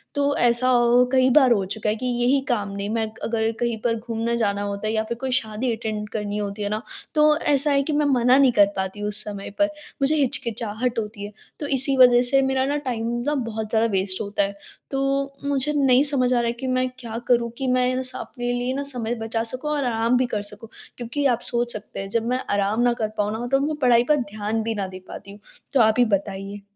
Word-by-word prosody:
तो 285 Hz, 0 st, +1 dB
ऐसा 240 Hz, +1 st, +3 dB
औ 240 Hz, -1 st, +4 dB, 0.2 s
औ -, -, +4 dB
कई 260 Hz, 0 st, +4 dB
बार 260 Hz, -2 st, +5 dB
हो 200 Hz, -4 st, +2 dB
चुका 210 Hz, +2 st, -3 dB
है 215 Hz, -, 0 dB
कि 255 Hz, +3 st, -6 dB
यही 245 Hz, +2 st, +2 dB
काम 205 Hz, -4 st, 0 dB
नहीं, 200 Hz, +1 st, -4 dB
मैं 220 Hz, -1 st, -1 dB
क -, -, -18 dB
अगर 225 Hz, -1 st, 0 dB
कहीं 235 Hz, -2 st, -1 dB
पर 230 Hz, -1 st, +1 dB
घूमने 230 Hz, 0 st, -2 dB
जाना 200 Hz, -3 st, 0 dB
होता 200 Hz, +1 st, -3 dB
है 220 Hz, -, -1 dB
या 220 Hz, 0 st, +1 dB
फ़िर 235 Hz, +1 st, -5 dB
कोई 260 Hz, -1 st, -2 dB
शादी 235 Hz, 0 st, 0 dB
अटेंड 215 Hz, -1 st, -4 dB
करनी 210 Hz, -1 st, -3 dB
होती 205 Hz, 0 st, -4 dB
है 205 Hz, -, -1 dB
ना, 215 Hz, +2 st, -2 dB, 0.3 s
तो 300 Hz, 0 st, +5 dB
ऐसा 290 Hz, -1 st, +3 dB
है 275 Hz, 0 st, +3 dB
कि 305 Hz, -, -2 dB
मैं 295 Hz, 0 st, +2 dB
मना 255 Hz, -1 st, +4 dB
नहीं 270 Hz, -3 st, +5 dB
कर 205 Hz, -3 st, +5 dB
पाती 190 Hz, +2 st, -3 dB
हूँ 205 Hz, -, -2 dB
उस 205 Hz, -, -4 dB
समय 200 Hz, -1 st, -6 dB
पर। 305 Hz, -, +4 dB, 0.3 s
मुझे 290 Hz, +3 st, +3 dB
हिचकिचाहट 240 Hz, -3 st, -1 dB
होती 210 Hz, -1 st, -6 dB
है, 205 Hz, -, -8 dB, 0.3 s
तो 290 Hz, -, -4 dB
इसी 270 Hz, 0 st, +1 dB
वजह 245 Hz, -1 st, +7 dB
से 270 Hz, +2 st, +4 dB
मेरा 265 Hz, 0 st, +1 dB
ना 290 Hz, +1 st, 0 dB
टाइम 230 Hz, -2 st, -2 dB, 0.2 s
ना 295 Hz, -, +1 dB
बहुत 220 Hz, -2 st, -4 dB
ज़्यादा 225 Hz, +1 st, +2 dB
वेस्ट 190 Hz, 0 st, 0 dB
होता 205 Hz, -1 st, -1 dB
है। 200 Hz, 0 st, -3 dB, 0.4 s
तो 275 Hz, 0 st, -1 dB
मुझे 285 Hz, +1 st, 0 dB
नहीं 270 Hz, -1 st, +4 dB
समझ 255 Hz, -3 st, +3 dB
आ -, -, +2 dB
रहा 235 Hz, -, 0 dB
है 235 Hz, -, 0 dB
कि 265 Hz, -, -4 dB
मैं 255 Hz, 0 st, +1 dB
क्या 230 Hz, -2 st, -6 dB
करूँ 235 Hz, -1 st, +2 dB
कि 265 Hz, -, -2 dB
मैं 255 Hz, 0 st, +1 dB
स 255 Hz, -, -5 dB
अपने 245 Hz, -2 st, -4 dB
लिए 245 Hz, +1 st, -1 dB
ना 280 Hz, +1 st, -2 dB
समय 245 Hz, -4 st, -3 dB
बचा 225 Hz, 0 st, -2 dB
सकूँ 255 Hz, +6 st, -4 dB
और 290 Hz, -2 st, 0 dB
आराम 230 Hz, +1 st, +1 dB
भी 255 Hz, -, +2 dB
कर 210 Hz, -3 st, -2 dB
सकूँ, 210 Hz, +2 st, -8 dB, 0.3 s
क्योंकि 250 Hz, +4 st, -3 dB
आप 245 Hz, -3 st, +2 dB
सोच 240 Hz, 0 st, -1 dB
सकते 215 Hz, -1 st, -8 dB
हैं 195 Hz, 0 st, -5 dB
जब 230 Hz, +2 st, -1 dB
मैं 255 Hz, +1 st, 0 dB
आराम 205 Hz, +3 st, +1 dB
ना 240 Hz, -1 st, +3 dB
कर 215 Hz, -, +1 dB
पाऊँ 210 Hz, 0 st, 0 dB
ना 220 Hz, -, -4 dB
मतलब 270 Hz, +3 st, 0 dB
अपनी 305 Hz, +2 st, -1 dB
पढ़ाई 240 Hz, -1 st, +5 dB
पर 300 Hz, -, +6 dB, 0.2 s
ध्यान 215 Hz, +1 st, -2 dB
भी 225 Hz, 0 st, -2 dB
ना 195 Hz, -2 st, -2 dB
दे 185 Hz, 0 st, -9 dB
पाती 200 Hz, -, -9 dB
हूँ, 205 Hz, -, -13 dB, 0.3 s
तो 270 Hz, -, +3 dB
आप 220 Hz, 0 st, +4 dB
ही 245 Hz, -, +6 dB
बताइए। 200 Hz, -1 st, -3 dB
235 Hz, 250 wpm, -23 LUFS, 215-260 Hz, 0.4 s, वजह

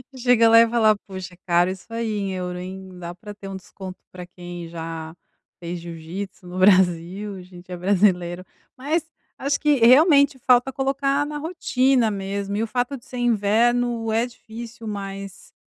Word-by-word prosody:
Chega 245 Hz, -2 st, +4 dB
lá 230 Hz, 0 st, +8 dB
e 230 Hz, -, +5 dB
falar: 220 Hz, -2 st, +4 dB
"Poxa 190 Hz, -2 st, -8 dB
cara 175 Hz, 0 st, +3 dB
isso 185 Hz, -1 st, -7 dB
aí 230 Hz, -1 st, -2 dB
em 200 Hz, -1 st, -2 dB
euro, 180 Hz, -1 st, -4 dB
hein, 185 Hz, 0 st, -8 dB
dá 175 Hz, -1 st, -6 dB
pra 205 Hz, +4 st, -10 dB
ter 200 Hz, -1 st, -10 dB
um 195 Hz, -, -5 dB
desconto 190 Hz, 0 st, -10 dB
pra 180 Hz, -1 st, -9 dB
quem 175 Hz, -1 st, -9 dB
já 165 Hz, -1 st, -6 dB, 0.5 s
fez 175 Hz, 0 st, -5 dB
jiu-jitsu 175 Hz, +3 st, -7 dB
no 180 Hz, +1 st, -7 dB
Brasil 185 Hz, +1 st, +3 dB
a 185 Hz, -, -9 dB
gente 180 Hz, 0 st, -14 dB
é -, -, -3 dB
brasileiro." 180 Hz, -1 st, +1 dB, 0.3 s
Mas 305 Hz, +6 st, -1 dB, 0.3 s
acho 280 Hz, +1 st, 0 dB
que 300 Hz, -1 st, +3 dB
realmente 280 Hz, +1 st, +6 dB
falta 250 Hz, +1 st, +4 dB
colocar 275 Hz, +1 st, 0 dB
na 295 Hz, 0 st, -5 dB
rotina 270 Hz, -7 st, +1 dB
mesmo, 200 Hz, 0 st, -3 dB
e 215 Hz, -, 0 dB
o -, -, -2 dB
fato 245 Hz, +4 st, -1 dB
de 240 Hz, -, -19 dB
ser 250 Hz, -, -8 dB
inverno 235 Hz, +1 st, +2 dB
é 225 Hz, +2 st, +2 dB
difícil 235 Hz, -1 st, -10 dB
mas, 195 Hz, -2 st, -7 dB
200 Hz, 170 wpm, -23 LUFS, 180-245 Hz, 0.5 s, lá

